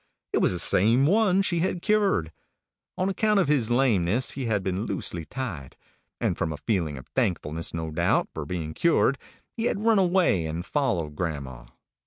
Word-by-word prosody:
It - - +3
was - - +3
the 90 - -1
same 115 +9 +3
one 195 +2 +3
she 175 -3 0
had 175 0 -1
cured. 200 - +1 0.7
On 185 - 0
account 210 +1 +2
of 185 - +2
his 135 -6 +2
lameness, 120 -3 +2
he 135 -2 -4
had 105 -4 0
been 95 +3 -2
loosely 90 -4 -4
tied, 95 - -6 0.4
and - - 0
from 80 - -2
a 75 - -5
feeling 85 -7 -1
of 65 - -10
thankfulness, 80 -2 -1
no 80 -1 -4
doubt, - - +1
for 80 - -4
being 80 -3 -4
cured, 145 - +2 0.4
he 225 - -2
had 210 -2 -1
run 225 -3 +5
away 175 - +2
and 80 +3 -4
followed 90 - -1
grandma. 70 -7 -5
110 Hz, 180 wpm, -26 LUFS, -, 0.7 s, run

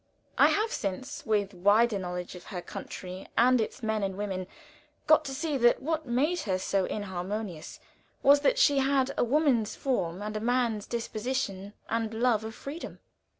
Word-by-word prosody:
I - - +6
have 435 +2 +1
since, 230 +9 -4
with 205 -2 +1
wider 205 +4 +3
knowledge 180 -1 -5
of 180 - -11
her 185 - -5
country 185 -2 -8
and 250 +1 +5
its 230 +3 -5
men 220 -1 0
and 195 -1 -2
women, 190 -3 -3 0.6
got 310 0 +5
to 275 - -4
see 290 +1 -1
that 240 -1 +4
what 315 +1 -2
made 290 +9 +1
her 190 -3 -1
so 190 0 0
inharmonious 190 -3 -5 0.4
was, 285 +1 +7
that - - +2
she 290 - +5
had 270 0 +2
a - - +2
woman's 245 -4 +2
form 195 -8 -1
and 210 0 -4
a - - -1
man's 235 -2 0
disposition 220 -4 -3
and 225 -1 -2
love 230 -2 +2
of 220 0 -6
freedom. 300 +5 -7
220 Hz, 170 wpm, -29 LUFS, 195-265 Hz, 0.6 s, was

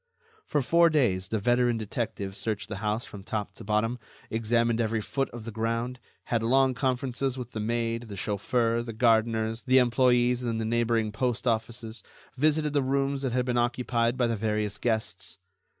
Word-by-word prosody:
For 145 - +1
four 170 +5 +5
days, 110 - +1
the 110 - -1
veteran 120 +2 +2
detective 105 -3 -4
searched 110 -1 -3
the 110 - -4
house 105 +3 -1
from 100 - -10
top 105 +1 -4
to - - -12
bottom, 110 +4 0 0.3
examined 115 +1 +1
every 110 0 0
foot 135 +5 -2
of 115 -2 -9
the 115 - -5
ground, 115 +3 -2 0.2
had 115 -2 0
long 130 +3 +3
conferences 130 0 -1
with 125 -1 -6
the 110 - -5
maid, 115 +1 -1
the 100 - -7
chauffeur, 115 +4 0
the 115 -1 -6
gardeners, 115 0 +2
the 130 0 +3
employees 125 0 +3
in 115 -2 -1
the 110 - -2
neighboring 115 -1 +1
post 120 +2 -1
offices, 115 -1 -2 0.3
visited 150 +2 +2
the 145 - +3
rooms 135 +1 0
that 130 -3 -1
had 125 0 +1
been 120 -1 +1
occupied 120 0 0
by 125 - +2
the 115 -1 0
various 105 -1 -1
guests. 110 -5 -2
115 Hz, 180 wpm, -28 LUFS, 110-125 Hz, 0.3 s, four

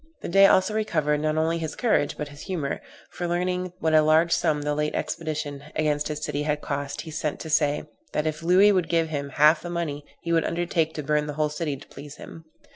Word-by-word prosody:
The - - -4
Dey 195 +2 +7
also 190 +3 +3
recovered, 155 -9 0
not 155 +1 0
only 165 +1 +1
his 160 -2 -4
courage, 220 - +1
but 150 -1 -4
his 145 0 -12
humor; 160 -8 -3 0.3
for 175 - -4
learning 180 +1 -1
what 160 0 0
a 155 - +7
large 160 +2 +4
sum 155 -4 +1
the 150 0 0
late 150 +1 -1
expedition 150 -3 -3
against 150 -1 0
his 150 0 -5
city 145 - -2
had 150 0 0
cost, 140 -1 -4
he 160 - -9
sent 150 -1 -3
to 160 - -6
say, 145 -1 +2 0.3
"that 150 - -1
if 155 0 -2
Louis 185 +5 +5
would 185 -4 +1
give 165 -1 +1
him 140 -2 -3
half 150 +3 +4
the 175 - -6
money, 165 -4 -3 0.2
he 170 - -1
would 165 -1 +3
undertake 170 -2 -1
to 150 - -4
burn 150 +1 +1
the 150 - -4
whole 150 +1 0
city 150 -2 -3
to 135 - -14
please 145 0 -11
him." 165 - -11
155 Hz, 230 wpm, -25 LUFS, 150-170 Hz, 0.3 s, Dey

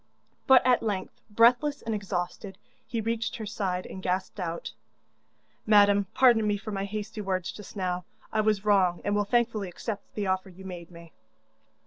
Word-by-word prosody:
But 265 -3 +7
at 250 -1 +4
length, 205 -4 -3
breathless 245 +7 +3
and 225 - -2
exhausted, 195 -1 -4 0.3
he 230 - -2
reached 225 +1 -2
her 225 -4 -5
side, 190 -3 -2
and 190 - -8
gasped 185 +2 -2
out: 170 -2 -4 0.9
'Madam, 205 -2 +5
pardon 235 -4 +5
me 205 -1 +1
for 215 +2 -7
my 195 -1 -2
hasty 215 +1 -5
words 185 -3 -2
just 210 0 -11
now; 180 -2 -2 0.3
I 215 - +3
was 210 -1 +1
wrong, 190 -4 +3
and 205 - +1
will 205 0 +1
thankfully 225 -3 +1
accept 205 +3 -6
the 210 - -2
offer 190 0 -1
you 190 +1 -13
made 175 -3 -8
me. 170 -1 -14
205 Hz, 170 wpm, -28 LUFS, 185-220 Hz, 0.9 s, But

